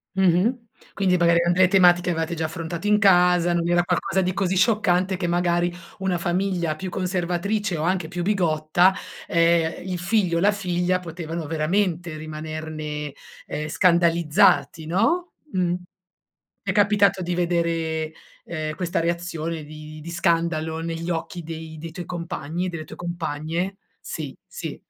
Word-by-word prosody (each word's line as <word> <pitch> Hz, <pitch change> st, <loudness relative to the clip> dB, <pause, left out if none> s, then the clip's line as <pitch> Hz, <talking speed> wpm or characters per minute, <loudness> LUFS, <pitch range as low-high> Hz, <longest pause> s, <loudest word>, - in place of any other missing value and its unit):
Mh-mh, 190 Hz, +6 st, +2 dB, 0.3 s
quindi 190 Hz, -2 st, +2 dB
magari, 170 Hz, 0 st, +4 dB
uhm, 175 Hz, -, +3 dB
le 185 Hz, +1 st, +5 dB
tematiche 180 Hz, -2 st, +5 dB
avevate 165 Hz, -1 st, -1 dB
già 160 Hz, -1 st, -2 dB
affrontato 165 Hz, +4 st, -4 dB
in 210 Hz, -, +5 dB
casa, 180 Hz, -3 st, +4 dB
non 170 Hz, 0 st, 0 dB
era 175 Hz, 0 st, +4 dB
qualcosa 180 Hz, +2 st, 0 dB
di 185 Hz, 0 st, 0 dB
così 190 Hz, -1 st, 0 dB
scioccante 190 Hz, -2 st, +2 dB
che, 180 Hz, -1 st, -2 dB
magari, 175 Hz, 0 st, +1 dB, 0.3 s
una 190 Hz, -2 st, 0 dB
famiglia 175 Hz, -2 st, 0 dB
più 185 Hz, +3 st, -5 dB
conservatrice 185 Hz, +2 st, -1 dB
o 155 Hz, -, -2 dB
anche 180 Hz, -1 st, 0 dB
più 175 Hz, +1 st, -4 dB
bigotta 175 Hz, -1 st, +3 dB, 0.3 s
ehm, 170 Hz, +1 st, +2 dB
il 180 Hz, -1 st, -3 dB
figlio 180 Hz, -2 st, +1 dB
o -, -, +2 dB
la 205 Hz, +2 st, +5 dB
figlia 180 Hz, -2 st, 0 dB
potevano 165 Hz, -1 st, -5 dB
veramente 170 Hz, +1 st, 0 dB
rimanerne, 155 Hz, -1 st, -5 dB, 0.3 s
ehm, 150 Hz, +1 st, -4 dB
scandalizzati, 170 Hz, -2 st, +3 dB
no? 235 Hz, -, +1 dB, 0.2 s
Mh. 180 Hz, -2 st, +1 dB, 0.9 s
È -, -, +2 dB
capitato 200 Hz, -2 st, +3 dB
di 175 Hz, 0 st, -2 dB
vedere, 165 Hz, -2 st, 0 dB, 0.3 s
ehm, 155 Hz, -2 st, -4 dB
questa 175 Hz, -2 st, -1 dB
reazione 165 Hz, -1 st, -2 dB
di 155 Hz, +1 st, -10 dB
di 165 Hz, -, -8 dB
scandalo, 165 Hz, -2 st, 0 dB
negli 165 Hz, +1 st, -4 dB
occhi 170 Hz, +2 st, -4 dB
dei 160 Hz, 0 st, -7 dB
dei 165 Hz, +1 st, -7 dB
tuoi 175 Hz, +2 st, -7 dB
compagni 170 Hz, -1 st, -4 dB
e -, -, -1 dB
delle 165 Hz, -3 st, -5 dB
tue 155 Hz, -, -11 dB
compagne? 170 Hz, +2 st, -3 dB, 0.2 s
Sì, -, -, -6 dB
sì. 485 Hz, -, -7 dB
175 Hz, 150 wpm, -24 LUFS, 160-185 Hz, 0.9 s, le